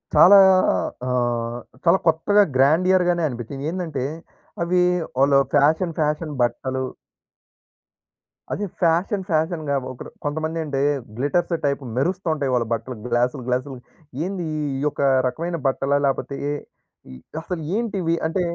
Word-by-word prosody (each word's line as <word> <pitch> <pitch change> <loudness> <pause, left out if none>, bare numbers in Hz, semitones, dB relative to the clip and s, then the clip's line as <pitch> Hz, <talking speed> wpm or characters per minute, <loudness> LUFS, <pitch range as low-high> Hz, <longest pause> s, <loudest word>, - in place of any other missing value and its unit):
చాలా 200 +3 +9 0.7
అహ్, 120 -1 -1 0.2
చాలా 175 +2 +5
కొత్తగా 205 +6 +4
గ్రాండియర్‌గానే 175 +5 +3
అనిపించింది. 135 +3 -6
ఏందంటే 165 -8 -3 0.6
అవి 180 +1 +2 0.4
వాళ్ళు 140 +1 +4 0.2
ఫ్యాషన్ 160 +4 +3
ఫ్యాషన్ 150 +1 0
బట్టలు 130 +2 -1 1.7
అది 205 - -2 0.2
ఫ్యాషన్ 180 +4 +1
ఫ్యాషన్‌గా 160 -3 0 0.2
ఒకడు 130 - -9 0.2
కొంతమంది 155 +2 -2
అంటే 140 -2 -2 0.4
గ్లిట్టర్స్ 170 +6 0
టైప్ 140 0 0 0.2
మెరుస్తూ 180 +6 -1
ఉంటాయి 140 -4 -2
వాళ్ళ 120 -2 +1
బట్టలు 115 +3 -4 0.2
గ్లాస్‌లు 125 +2 +1
గ్లాసులు, 130 +1 -2 0.5
ఏంది 185 -2 -3 0.3
ఈ - - -4
యొక్క 145 - -3 0.3
రకమైన 170 +6 -3
బట్టలా? 135 +1 +1
లేకపోతే 140 0 -1
ఏ - - -1 0.6
ఏ - - -10 0.3
అసలు 165 0 -5
ఏంటివి? 195 -7 0
అంటే 160 +3 0
155 Hz, 120 wpm, -22 LUFS, 135-175 Hz, 1.7 s, చాలా